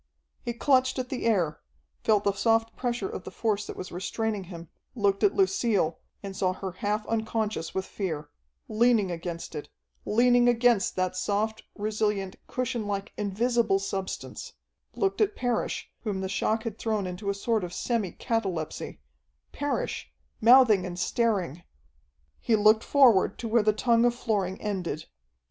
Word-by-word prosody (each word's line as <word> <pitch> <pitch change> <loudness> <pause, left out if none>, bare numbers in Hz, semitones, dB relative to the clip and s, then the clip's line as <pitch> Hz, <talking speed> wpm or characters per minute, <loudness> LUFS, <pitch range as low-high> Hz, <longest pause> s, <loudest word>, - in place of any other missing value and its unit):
He 235 - -3
clutched 260 +1 +2
at 255 -1 -3
the 250 -3 -2
air, 175 -9 +1 0.4
felt 210 -2 +3
the 200 - +3
soft 225 +3 +1
pressure 240 -5 -2
of 185 - -6
the - - -7
force 210 -2 -1
that - - -7
was 185 - -6
restraining 205 +3 -2
him, 170 -2 -9 0.3
looked 200 -3 +1
at 400 - +4
Lucille, 235 - +2 0.2
and 195 -1 -6
saw 185 -1 +1
her 190 0 -5
half 210 +4 -2
unconscious 220 -6 -2
with 190 0 -1
fear, 160 -7 -4 0.4
leaning 220 -3 +3
against 170 0 -5
it, 150 -2 -6 0.3
leaning 245 +2 +4
against 240 -4 +3
that 185 0 0
soft, 215 +3 -1
resilient, 210 -2 -1
cushionlike, 220 -5 -3
invisible 220 +1 +1
substance; 195 -1 -5 0.4
looked 395 +1 0
at 420 -1 +2
Parrish, 245 -2 -2
whom 200 -4 -2
the 190 - -2
shock 220 +3 0
had 225 -2 -5
thrown 215 -3 -1
into 185 +3 -4
a 200 - 0
sort 220 +1 0
of 175 - -4
semi 215 0 -1
catalepsy 195 -10 -3 0.5
Parrish, 290 - -3 0.3
mouthing 230 -4 +7
and 175 -1 -5
staring! 190 - 0 0.8
He 230 - +2
looked 215 +1 +5
forward 250 -9 +5
to 235 - -4
where 230 +1 +4
the 215 +1 +3
tongue 230 +2 +3
of 240 0 +2
flooring 200 -6 -1
ended. 180 -7 -3
215 Hz, 155 wpm, -27 LUFS, 190-235 Hz, 0.8 s, mouthing